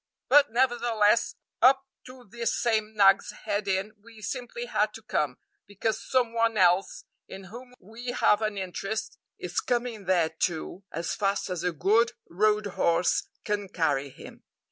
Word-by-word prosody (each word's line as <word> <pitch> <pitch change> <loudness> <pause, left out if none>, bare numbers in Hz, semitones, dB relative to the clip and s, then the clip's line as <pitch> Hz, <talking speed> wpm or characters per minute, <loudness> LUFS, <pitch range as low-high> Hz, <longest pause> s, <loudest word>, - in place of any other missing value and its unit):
But, 290 -1 +6
nevertheless, 235 -3 +2 0.3
up 265 +2 +5 0.2
to 255 0 -12
this 235 +3 -2
same 220 -2 0
Nag's 195 -1 +5 0.2
Head 205 -1 -1
Inn 195 +2 -1
we 225 0 -16
simply 260 - -5
had - - 0
to - - -11
come, - - -1 0.3
because 210 +2 -2
some 245 -3 +1
one 230 -1 +1
else, 180 0 +2 0.2
in 195 0 -9
whom 245 +6 -12
we 225 +6 -11
have 235 -3 +2
an 215 -2 -2
interest, 205 +4 -4 0.2
is 175 0 -3
coming 240 -4 -2
there 175 -4 +2
too 165 +3 -3
as 165 +2 -3
fast 200 -1 -1
as 180 -2 -3
a 180 - +1
good 215 +9 +2
road 210 +3 +1
horse 175 -3 +1 0.2
can 205 -2 -2
carry 145 -6 0
him. - - -13
210 Hz, 155 wpm, -27 LUFS, 190-235 Hz, 0.3 s, But